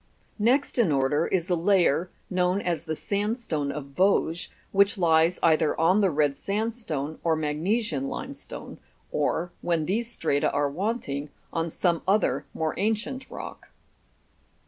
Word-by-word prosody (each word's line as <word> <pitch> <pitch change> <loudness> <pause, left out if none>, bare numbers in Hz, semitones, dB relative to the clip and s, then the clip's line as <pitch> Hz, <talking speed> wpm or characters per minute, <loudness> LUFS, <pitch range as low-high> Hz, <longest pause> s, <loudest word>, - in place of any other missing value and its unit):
Next 250 +5 +2
in 205 -9 +4
order 140 +3 +2
is 180 -2 0
a - - +4
layer, 175 -2 +3 0.2
known 180 +1 +1
as 170 -4 -2
the 160 -1 -2
sandstone 200 - -1
of 140 -1 -7
Vosges, 180 -2 +2 0.2
which 200 +3 +4
lies 165 0 +4
either 160 -2 +3
on 180 +6 +4
the 195 - +4
red 145 -3 +1
sandstone 195 - -3
or 165 -1 +3
magnesian 155 - -1
limestone; - - -7 0.3
or, 175 +1 0
when 165 -3 0
these 230 +7 -1
strata 145 -9 +1
are 145 0 +1
wanting, 155 - -2 0.2
on 165 0 -1
some 170 0 +1
other 205 +3 +2
more 160 -1 -1
ancient 225 +6 -1
rock. - - -8
170 Hz, 140 wpm, -26 LUFS, 155-205 Hz, 0.3 s, in